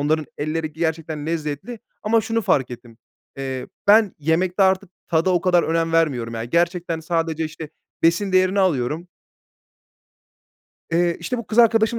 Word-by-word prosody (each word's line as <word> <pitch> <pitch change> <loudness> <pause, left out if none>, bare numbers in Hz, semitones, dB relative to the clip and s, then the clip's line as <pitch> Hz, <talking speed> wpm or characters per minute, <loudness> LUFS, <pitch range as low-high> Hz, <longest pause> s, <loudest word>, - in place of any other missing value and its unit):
onların 155 0 0
elleri 155 +1 -2
gerçekten 160 -1 -3
lezzetli. 160 - -4 0.2
Ama 225 +1 +3
şunu 225 +1 -1
fark 135 -8 +1
ettim: 120 -1 -11 0.4
Eee, 130 -1 -4 0.2
ben 210 -1 +5
yemekte 175 +5 +1
artık 190 0 +2 0.2
tada 170 +2 +2
o 175 - +2
kadar 180 -1 +3
önem 165 0 0
vermiyorum 130 -8 +1
ya. 115 0 -3
Gerçekten 170 +3 0
sadece, 165 -1 -1
işte, 155 0 -7 0.3
besin 180 +4 +2
değerini 185 +1 +3
alıyorum. 160 0 0 1.8
Eee, 170 0 +2
işte, 250 -2 -3
bu 235 - -6
kız 225 - -3
arkadaşım 225 0 +4
165 Hz, 145 wpm, -22 LUFS, 155-190 Hz, 1.8 s, ben